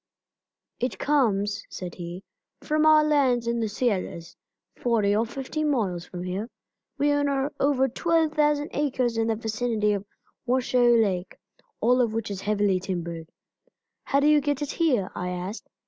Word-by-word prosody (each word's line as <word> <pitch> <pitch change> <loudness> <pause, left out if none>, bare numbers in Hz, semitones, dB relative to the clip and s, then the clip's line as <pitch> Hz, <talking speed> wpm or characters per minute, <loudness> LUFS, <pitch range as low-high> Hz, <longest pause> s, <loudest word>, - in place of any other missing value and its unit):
"It 250 +2 -2
comes," 205 -8 +1
said 180 -2 -7
he, 175 +1 -7 0.4
"from 310 0 +2
our 310 0 +7
lands 270 -6 +2
in 235 0 0
the 220 -2 -1
Sierras, 195 -7 -2 0.4
forty 215 -4 +1
or 225 +2 +1
fifty 270 +5 -4
miles 205 - 0
from 180 -1 -7
here. 190 +5 -4 0.5
We 290 +1 +2
own 285 0 +1 0.3
over 270 -1 +3
twelve 325 +4 +1
thousand 295 -1 +2
acres 260 -5 0
in 225 0 +1
the 225 - +1
vicinity 220 -1 0
of 200 0 -4 0.4
Washoe 245 -1 +3
Lake, 190 -5 0 0.4
all 250 +2 +4
of 230 -3 0
which 225 -2 -3
is 195 -1 -5
heavily 205 -2 +1
timbered." 170 -3 -5 0.8
"How 275 - +2
do 285 - +2
you 300 -1 +5
get 290 0 -1
it 290 - -3
here?" 255 - +1
I 180 - -4
asked. 180 +4 -6
230 Hz, 160 wpm, -26 LUFS, 200-280 Hz, 0.8 s, our